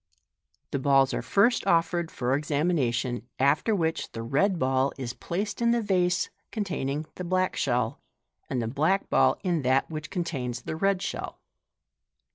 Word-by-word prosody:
The 140 - -1
balls 135 -1 +4
are - - -1
first 230 +4 +2
offered 170 0 +2
for 130 -2 0
exa 145 0 -1
mination, 125 -7 0 0.2
after 150 - +2
which 160 -4 -1
the 115 0 -5
red 175 - +1
ball 130 -1 +1
is 125 -3 -4
placed 200 - -4
in 235 - +3
the 235 0 +3
vase 180 -3 +1 0.2
containing 155 -8 -2
the 180 - -4
black 185 +1 0
shell, 120 -3 0 0.5
and 125 -3 -1
the - - -2
black 155 - 0
ball - - +4
in 175 -5 +1
that 130 +4 +2
which 155 0 -5
contains 130 - -3
the - - -4
red 195 +2 +1
shell. - - -4
155 Hz, 160 wpm, -27 LUFS, 130-185 Hz, 0.5 s, balls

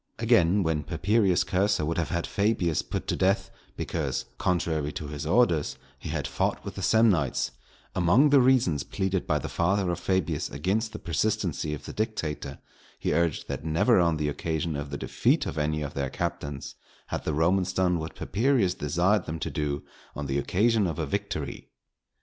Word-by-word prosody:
Again, 90 +4 +3
when 80 -2 0
Papirius 100 +3 +2
Cursor 95 -3 +1
would 80 +2 -1
have 85 - -1
had 85 -1 -1
Fabius 100 -6 +1
put - - -4
to - - 0
death, 95 +2 +1 0.3
because, - - -2
contrary 80 -4 0
to 75 - -5
his 75 +1 -5
orders, 85 -6 +2 0.2
he - - -7
had - - -2
fought - - -1
with - - -5
the - - -6
Samnites, 95 - +3 0.4
among 100 - +4
the 140 - +7
reasons 125 - +3
pleaded 95 -1 -2
by 75 - +2
the - - -4
father 95 +1 +1
of 85 - -3
Fabius 95 -3 0
against 95 - -1
the - - -6
persistency 85 -5 -1
of 70 - -12
the - - -7
dictator, 105 -9 -3 0.4
he - - -1
urged 85 -3 0
that - - -4
never 95 +9 +3
on 85 -2 +3
the 75 -1 -1
occasion 80 +2 -2
of 70 0 -4
the 70 - -4
defeat - - +1
of 75 - -3
any 75 0 0
of 75 - -5
their 70 -1 -2
captains 70 0 -4 0.4
had - - -3
the 75 - -1
Romans 90 +4 +2
done 90 -2 +1
what 80 0 -6
Papirius 110 -4 +1
desired 90 +5 +1
them 80 - -3
to 80 0 -4
do 70 0 -2 0.3
on 75 - -4
the 70 0 0
occasion 105 +6 +2
of 80 - -3
a 80 - -1
victory. 90 -6 -4
85 Hz, 185 wpm, -27 LUFS, 75-100 Hz, 0.4 s, the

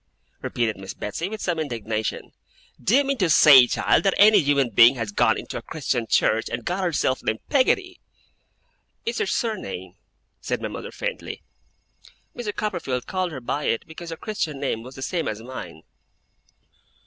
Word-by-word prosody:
repeated 115 -4 -1
Miss 95 0 -8
Betsey, 165 - -4
with 220 0 -6
some 175 -3 -1
indignation. 110 -7 -3 0.5
'Do 215 - +3
you 285 - +5
mean 275 -2 -2
to 180 -4 +2
say, 140 -5 +8
child, - - +2
that 195 -2 +1
any 210 0 +7
human 140 -5 +2
being 115 +5 +7
has 115 -4 -4
gone - - +3
into - - -6
a - - -12
Christian 130 -6 -2
church, 110 +1 +2
and 120 -1 -5
got 185 +2 -1
herself 145 -6 0
named 110 - -1
Peggotty?' 365 +7 +2 1.1
'It's 465 - -2
her 435 - 0
surname,' 225 - -3 0.5
said - - -3
my - - -4
mother, - - -7
faintly. - - -5 0.9
'Mr. 235 -4 -3
Copperfield 170 -12 -3
called 185 -2 -2
her 140 - -6
by 140 +4 -3
it, 115 - 0
because 165 +1 -9
her 165 - -6
Christian 170 -8 -3
name 135 -5 -2
was 130 +3 -11
the 135 - -7
same 170 +3 -2
as 105 - -3
mine. 130 +2 -8
150 Hz, 170 wpm, -24 LUFS, 120-200 Hz, 1.1 s, say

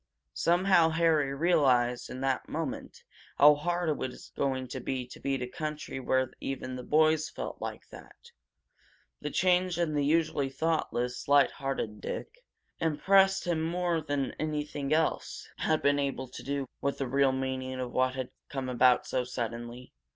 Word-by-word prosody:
Somehow 175 -1 +4
Harry 160 -4 +2
realized 135 -6 +2
in 130 - -6
that 135 -1 -1
moment 155 -3 -5 0.3
how 150 +1 +8
hard 175 +4 -1
it 155 - +1
was 130 -1 -6
going 130 -2 -1
to 130 - -5
be 130 0 -3
to 125 - -12
beat 135 -2 -1
a - - -3
country 150 0 -5
where 130 0 0
even 130 -1 -4
the 125 - -5
boys 155 +3 +3
felt - - -6
like - - -6
that! - - -13 1.1
The - - -3
change 180 -1 +2
in 170 -3 0
the 145 -1 +1
usually 150 -2 +1
thoughtless, 135 -5 -1
light 140 -1 +5
hearted 135 -6 -4
Dick - - -6 0.4
impressed 195 +5 +3
him 170 -3 0
more 170 0 0
than 145 -3 -2
anything 150 -2 -3
else 160 +1 0
had 155 -1 0
been 145 0 +3
able 135 -2 -2
to - - -9
do 140 0 -2 0.2
with 140 0 -1
the 135 - -2
real 135 +1 +3
meaning 130 -1 -3
of 125 -1 -3
what 130 0 +1
had 130 -1 -4 0.2
come 135 -2 -4
about 125 0 +4
so 130 - -1
suddenly. 120 0 -6
140 Hz, 165 wpm, -29 LUFS, 130-160 Hz, 1.1 s, how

